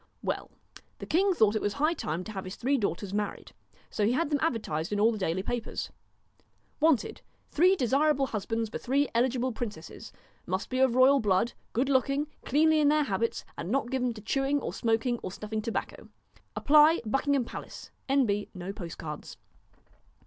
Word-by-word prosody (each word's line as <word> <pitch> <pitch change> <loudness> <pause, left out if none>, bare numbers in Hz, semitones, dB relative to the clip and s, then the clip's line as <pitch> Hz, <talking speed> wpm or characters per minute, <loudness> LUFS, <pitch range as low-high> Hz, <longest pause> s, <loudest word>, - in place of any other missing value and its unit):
Well - - -3 0.5
the - - -7
king 380 +3 +2
thought 220 -6 +3
it 215 - 0
was 205 - -1
high 305 +3 +1
time 170 - -3
to 215 - -8
have 190 -3 -5
his 185 - -6
three 270 +4 0
daughters 200 - -2
married. 210 0 -3 0.4
So 210 - -1
he 220 +4 +3
had 310 +3 0
them 290 - +2
advertised 210 - -1
in 205 - 0
all 220 +3 +5
the 220 - -4
daily 185 0 -1
papers: 240 +2 -4 0.9
WANTED, 315 -5 +2 0.3
three 365 +5 +4
desirable 275 0 +2
husbands, 225 -1 -2
for 215 - -6
three 275 +2 +1
eligible 250 +1 +1
Princesses. 210 -8 -7 0.4
Must 185 +6 -3
be 255 - 0
of 260 -2 +3
Royal 265 +2 +6
blood, 205 +1 +1 0.2
good 255 +4 0
looking, 275 +2 +2 0.2
cleanly 310 +3 +3
in 295 - +4
their 300 +1 +4
habits, 230 -2 -2
and 170 - -4
not 255 +1 0
given 250 -2 0
to 215 - -9
chewing 270 +6 0
or - - -5
smoking 230 +1 0
or 185 - -5
snuffing 215 +2 -4
tobacco. 225 +1 -4 0.5
Apply: 305 +3 +5
Buckingham 270 +2 +1
Palace. - - -9 0.2
N.B. 230 -7 +1
No 185 +2 -5
post 175 -5 -7
cards. 150 -1 -7
240 Hz, 180 wpm, -29 LUFS, 210-280 Hz, 0.9 s, Royal